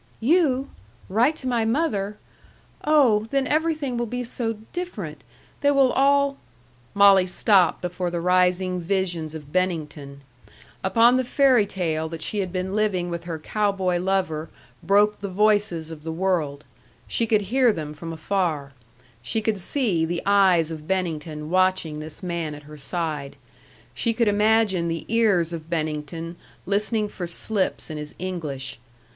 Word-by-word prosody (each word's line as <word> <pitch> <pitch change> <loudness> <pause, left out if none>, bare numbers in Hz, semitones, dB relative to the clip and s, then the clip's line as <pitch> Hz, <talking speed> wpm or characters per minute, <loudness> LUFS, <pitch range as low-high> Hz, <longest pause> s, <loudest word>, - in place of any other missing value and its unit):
"You! 275 0 +2 0.4
Write 235 +10 +3
to 265 - -7
my 240 -3 +1
mother! 220 -5 -1 0.7
Oh, 255 -9 +4
then 275 +1 +1
everything 305 -4 0
will 240 0 -1
be 250 +2 -3
so 230 -1 +1 0.2
different! 205 - -5 0.4
They 285 - +4
will 275 -3 +4
all 280 0 +3 0.3
" 120 0 -32
Molly 200 -2 +6
stopped 185 -2 +3
before 180 0 -2
the 170 0 -3
rising 180 +1 +2
visions 175 -3 -2
of 150 -2 -9
Bennington. 155 -6 -2 0.6
Upon 230 +6 +5
the 260 - +1
fairy 255 -4 +3
tale 160 -5 -2
that 165 -1 -5
she 210 - -2
had 185 -3 -2
been 185 +1 -3
living 190 -5 0
with 170 0 -5
her 170 -2 -4
cow 205 +6 0
boy 185 -3 0
lover 180 -4 -1 0.3
broke 205 +4 +3
the 200 - -5
voices 205 -5 +1
of 155 -2 -9
the 160 - -4
world. 160 -5 -1 0.4
She 230 - 0
could 215 -1 +3
hear 260 -3 +5
them 155 -6 -5
from 165 +2 -7
afar. 160 -4 -2 0.5
She 170 - -1
could 215 -2 -1
see 195 - 0
the 170 +1 -2
eyes 190 -5 +4
of 155 -1 -8
Bennington 160 -4 -3
watching 185 -4 +1
this 155 +4 -8
man 170 -4 -3
at 145 - -12
her 150 +1 -12
side. 150 -1 -4 0.6
She 230 - 0
could 235 -1 +2
imagine 210 -3 +2
the 165 0 -3
ears 205 -7 +2
of 160 -1 -7
Bennington 160 +1 -3 0.3
listening 210 +2 0
for 180 -3 -6
slips 190 0 -2
in 155 - -5
his 150 0 -8
English. 155 -10 -5
185 Hz, 155 wpm, -24 LUFS, 160-220 Hz, 0.7 s, Molly